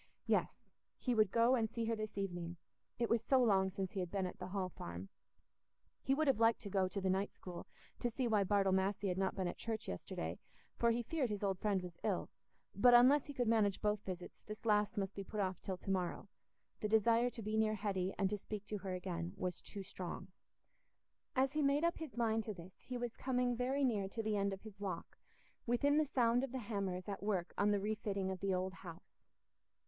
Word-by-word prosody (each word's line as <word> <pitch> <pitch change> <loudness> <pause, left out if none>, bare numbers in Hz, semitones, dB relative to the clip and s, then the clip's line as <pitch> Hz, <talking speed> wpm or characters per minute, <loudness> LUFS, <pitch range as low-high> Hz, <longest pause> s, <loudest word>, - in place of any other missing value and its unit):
Yes, - - +3 0.5
he 250 - 0
would 215 -3 +4
go 230 +4 +4
and 225 -4 +2
see 230 0 -2
her 230 0 +1
this 215 -2 -5
evening—it 175 +5 -4
was 230 0 +2
so 265 +3 +3
long 195 -6 +4
since 190 0 -3
he 195 - -3
had 180 -2 -2
been 195 0 -1
at 180 - -6
the 180 - -5
Hall 185 -1 -2
Farm. 90 - -7 0.9
He 270 - +2
would 315 +2 +2
have 270 -6 +3
liked 225 0 +5
to 200 - -6
go 190 -1 +2
to 200 - -3
the 190 - -1
night 195 +2 0
school, 180 -2 -8 0.3
to 240 - 0
see 245 +2 -1
why 215 -3 +3
Bartle 195 0 +3
Massey 195 +1 +1
had 180 - -1
not 190 -1 +1
been 190 -2 -1
at - - -5
church 225 -1 -3
yesterday, - - -4 0.4
for 235 - +3
he 235 +1 +1
feared 275 -1 0
his 210 -1 -3
old 195 -2 0
friend 200 -3 +1
was 175 -2 -9
ill; 200 -4 -1 0.4
but, 245 +5 +7
unless 260 +4 +7
he 285 - -6
could 245 -2 +1
manage 215 -3 +3
both 210 -1 +1
visits, 180 -2 -7
this 215 +1 -7
last 210 +1 +3
must 195 -1 -1
be 195 - -5
put 210 +2 -5
off 185 -2 -1
till 190 -2 -3
to 195 - -4
morrow—the 190 +3 -4
desire 230 +3 +4
to 230 -2 -8
be 215 +1 -1
near 220 0 +3
Hetty 195 -3 -1
and 195 - +2
to 210 - -1
speak 210 0 -6
to 210 - -2
her 190 -1 -3
again 175 -1 -4
was 180 -2 -3
too 200 -2 -7
strong. 185 0 -6 1.1
As 265 +1 +3
he 305 - +1
made 280 +2 +3
up 340 0 +1
his 315 -6 -7
mind 225 -2 +2
to 215 - -4
this, 180 +1 -11
he 255 - -5
was 240 -1 -3
coming 250 -1 +1
very 260 +4 0
near 210 -7 +1
to 225 +3 -3
the 215 -1 0
end 200 0 +1
of 195 - -5
his 210 -3 -11
walk, 200 -2 -5 0.5
within 285 +5 +3
the 310 - +2
sound 245 -1 +3
of 270 - -3
the - - -1
hammers 200 -5 -3
at 200 -1 -4
work 195 -4 -1
on 205 - +3
the 205 -1 +3
refitting 200 -2 -1
of 190 - -4
the 195 +1 0
old 185 0 0
house. 175 -2 -12
205 Hz, 225 wpm, -37 LUFS, 190-235 Hz, 1.1 s, but